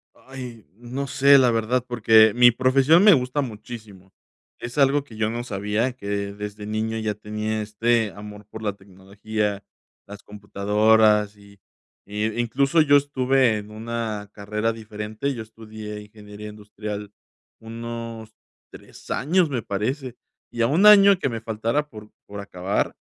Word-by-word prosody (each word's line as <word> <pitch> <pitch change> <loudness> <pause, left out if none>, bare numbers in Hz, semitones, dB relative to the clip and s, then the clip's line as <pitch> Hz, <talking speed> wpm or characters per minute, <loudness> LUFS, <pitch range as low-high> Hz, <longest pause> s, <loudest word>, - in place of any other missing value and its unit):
Ay, 125 -5 -10
no 125 +5 -6
sé, 140 +1 +5
la 125 -2 +4
verdad, 115 +2 0
porque 110 -2 +5
mi 120 0 +7
profesión 135 - +4
me 210 - +8
gusta 130 0 +1
muchísimo. 105 -5 -9 0.5
Es 120 +5 -7
algo 140 +1 +3
que 115 -6 -14
yo 110 0 0
no 120 +1 -4
sabía, 105 +4 -1
que 100 -3 -4
desde 105 0 -7
niño 110 +1 -2
ya 110 -1 -2
tenía 105 +1 -4
este 110 0 0
amor 105 0 -11
por 110 +1 -10
la 105 -2 -2
tecnología, 100 +2 -5 0.4
las 100 0 -11
computadoras, 105 +1 +2
y 100 -1 -18 0.5
y 105 +3 -2
incluso 135 +7 +1
yo 145 -1 +5
estuve 130 -4 +2
en 105 +1 -10
una 110 -2 -5
carrera 105 +2 -2
diferente. 110 +4 -5
Yo 115 - -6
estudié 110 -1 -9
ingeniería 105 0 -11
industrial 105 0 -8 0.5
unos 115 -1 -7 0.4
3 - - -15
años, 165 +3 +1
me 120 -4 -2
parece, 125 +6 -3 0.3
y 120 - -2
a - - +4
1 180 +8 +3
año 200 -2 +8
que 140 - -1
me 115 -2 -5
faltara 115 +7 -2
por 105 -2 -12 0.2
por 100 0 -8
acabar, 95 0 -3
110 Hz, 150 wpm, -23 LUFS, 105-125 Hz, 0.5 s, me